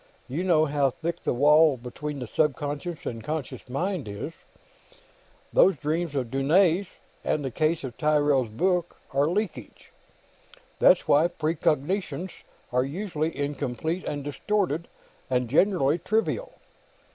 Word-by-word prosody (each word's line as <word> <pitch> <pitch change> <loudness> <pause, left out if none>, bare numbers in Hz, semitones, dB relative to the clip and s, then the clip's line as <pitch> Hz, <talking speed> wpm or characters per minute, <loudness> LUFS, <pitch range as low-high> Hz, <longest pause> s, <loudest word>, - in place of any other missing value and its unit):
You 155 +8 -2
know 165 -4 +4
how 145 -2 +2
thick 170 +6 -4
the - - 0
wall 150 +2 +5
between 140 +5 -6
the 125 - -5
subconscious 145 +4 -2
and 115 -2 -4
the - - -15
conscious 150 -2 -5
mind 170 - -2
is. 100 +10 -5 1.2
These 190 - +5
dreams 155 +1 -2
of 125 -4 -2
Dunne's, 170 +7 +3 0.4
and 150 -2 0
the 130 - -2
cases 155 +4 0
in 130 - -4
Tyrrell's 145 -5 +2
book, 175 - 0
are 140 +2 +2
leakage. 175 - -4 0.9
That's - - +5
why 150 +4 +5
precognitions 170 +3 -1 0.4
are 125 +1 +2
usually 160 0 -3
incomplete 145 +4 -2
and 145 -1 -3
distorted, 170 +2 -1 0.4
and 125 -1 +1
generally 160 - +3
trivial. 225 - -1
150 Hz, 130 wpm, -26 LUFS, 135-175 Hz, 1.2 s, wall